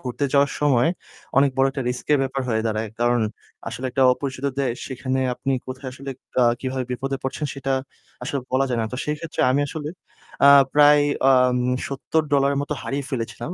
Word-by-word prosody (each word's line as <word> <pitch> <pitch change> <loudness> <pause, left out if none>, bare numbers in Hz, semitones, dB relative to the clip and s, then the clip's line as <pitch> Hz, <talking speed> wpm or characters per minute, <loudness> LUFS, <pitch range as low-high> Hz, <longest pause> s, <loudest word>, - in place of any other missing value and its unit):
ঘুরতে 130 +2 -3
যাওয়ার 140 0 +4
সময় 135 -2 +3 0.5
অনেক 140 0 +4
বড় 135 0 +4
একটা 135 -1 -4
risk 125 - -4
এর 145 - +5
ব্যাপার 135 0 -2
হয়ে 110 -1 0
দাঁড়ায়। 110 0 -2
কারণ 120 0 +2 0.5
আসলে 115 +3 -5
একটা 135 +2 +1
অপরিচিত 130 0 -5 0.2
দেশ 125 -3 0
সেখানে 130 0 -2
আপনি 135 +1 -2
কোথায় 130 +1 -6
আসলে 135 +1 -8 0.3
আ - - +5 0.2
কিভাবে 130 -1 -3
বিপদে 135 +2 -2
পড়ছেন 135 +3 -3
সেটা 135 0 -2 0.5
আসলে 135 +3 -2
বলা 135 +1 +3
যায় 120 -2 -1
না। 110 - -1
তো - - -3
সেই 150 - -1
ক্ষেত্রে 165 0 -5
আমি 140 - +2
আসলে 150 0 -5 0.6
আ - - +9 0.3
প্রায় 145 0 +6 0.3
আম 125 -1 +4 0.3
$৭০ 140 0 0
এর - - -1
মতো 150 +1 -3
হারিয়ে 140 +1 -3
ফেলেছিলাম 120 +2 -4
135 Hz, 185 wpm, -23 LUFS, 125-140 Hz, 0.6 s, আ